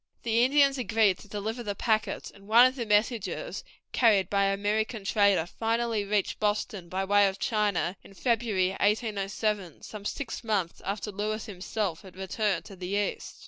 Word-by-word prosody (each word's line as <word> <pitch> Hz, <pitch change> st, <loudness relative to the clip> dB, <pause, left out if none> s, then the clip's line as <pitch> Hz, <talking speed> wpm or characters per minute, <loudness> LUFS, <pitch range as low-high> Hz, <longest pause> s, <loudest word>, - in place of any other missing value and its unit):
The 230 Hz, 0 st, +3 dB
Indians 275 Hz, +1 st, +4 dB
agreed 220 Hz, -5 st, +2 dB
to -, -, -13 dB
deliver 215 Hz, +4 st, -4 dB
the 205 Hz, -3 st, -3 dB
packets, 220 Hz, 0 st, -1 dB
and 200 Hz, 0 st, -17 dB
one 235 Hz, +3 st, +8 dB
of 255 Hz, -, +3 dB
the 235 Hz, -4 st, -4 dB
messages, 215 Hz, -, 0 dB, 0.3 s
carried 205 Hz, -6 st, +3 dB
by 200 Hz, -1 st, +3 dB
an 195 Hz, 0 st, +2 dB
American 215 Hz, +1 st, -1 dB
trader, 200 Hz, -5 st, +3 dB
finally 225 Hz, +2 st, -1 dB
reached 200 Hz, -1 st, -1 dB
Boston 205 Hz, -3 st, -1 dB
by 190 Hz, +2 st, -1 dB
way 205 Hz, +1 st, +5 dB
of 190 Hz, 0 st, -3 dB
China 205 Hz, -5 st, 0 dB
in 195 Hz, -, -15 dB
February, 220 Hz, -5 st, +1 dB
1807, 205 Hz, -2 st, -1 dB
some 210 Hz, -2 st, -8 dB
six 230 Hz, +3 st, -4 dB
months 200 Hz, -7 st, -1 dB
after 205 Hz, +2 st, -3 dB
Lewis 215 Hz, +2 st, -3 dB
himself 195 Hz, -2 st, -3 dB
had 190 Hz, -3 st, -14 dB
returned 195 Hz, +2 st, -1 dB
to 195 Hz, -, -10 dB
the 180 Hz, -1 st, -6 dB
East. 205 Hz, 0 st, -2 dB
210 Hz, 170 wpm, -28 LUFS, 195-225 Hz, 0.3 s, one